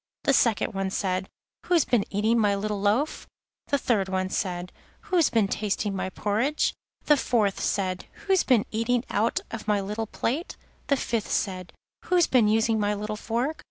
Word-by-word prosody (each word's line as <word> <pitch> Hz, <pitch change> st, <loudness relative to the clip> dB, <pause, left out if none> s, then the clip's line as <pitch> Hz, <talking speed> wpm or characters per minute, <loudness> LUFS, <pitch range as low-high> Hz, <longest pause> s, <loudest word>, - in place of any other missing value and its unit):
The 275 Hz, -, +3 dB
second 195 Hz, -5 st, +1 dB
said: 185 Hz, -1 st, -1 dB, 0.4 s
'Who's 345 Hz, -4 st, +3 dB
been 235 Hz, -5 st, +2 dB
eating 220 Hz, +4 st, +2 dB
my 205 Hz, -2 st, +3 dB
little 205 Hz, 0 st, -2 dB
loaf?' 220 Hz, +10 st, 0 dB, 0.4 s
The 285 Hz, -, +2 dB
third 210 Hz, -8 st, 0 dB, 0.2 s
said: 180 Hz, -3 st, -2 dB, 0.3 s
'Who's 370 Hz, -8 st, +2 dB
been 220 Hz, -4 st, +2 dB
tasting 205 Hz, 0 st, -1 dB
my 190 Hz, -, -2 dB
porridge?' 220 Hz, +10 st, 0 dB, 0.3 s
The 295 Hz, -, +6 dB
fourth 220 Hz, -7 st, +1 dB
said: 185 Hz, -2 st, -1 dB, 0.2 s
'Who's 385 Hz, -2 st, +4 dB
been 240 Hz, -6 st, +3 dB
eating 230 Hz, +2 st, 0 dB
out 220 Hz, +3 st, +1 dB
of 225 Hz, -1 st, -6 dB
my 210 Hz, -1 st, +2 dB
little 210 Hz, +3 st, -3 dB
plate?' 275 Hz, -, -3 dB, 0.3 s
The 280 Hz, -, +3 dB
fifth 230 Hz, -4 st, -2 dB
said: 185 Hz, -3 st, -2 dB, 0.3 s
'Who's 355 Hz, -2 st, +4 dB
been 240 Hz, -5 st, +3 dB
using 220 Hz, +1 st, +2 dB
my 210 Hz, 0 st, +1 dB
little 210 Hz, +1 st, -4 dB
fork? 240 Hz, +8 st, -2 dB
215 Hz, 160 wpm, -26 LUFS, 200-245 Hz, 0.4 s, The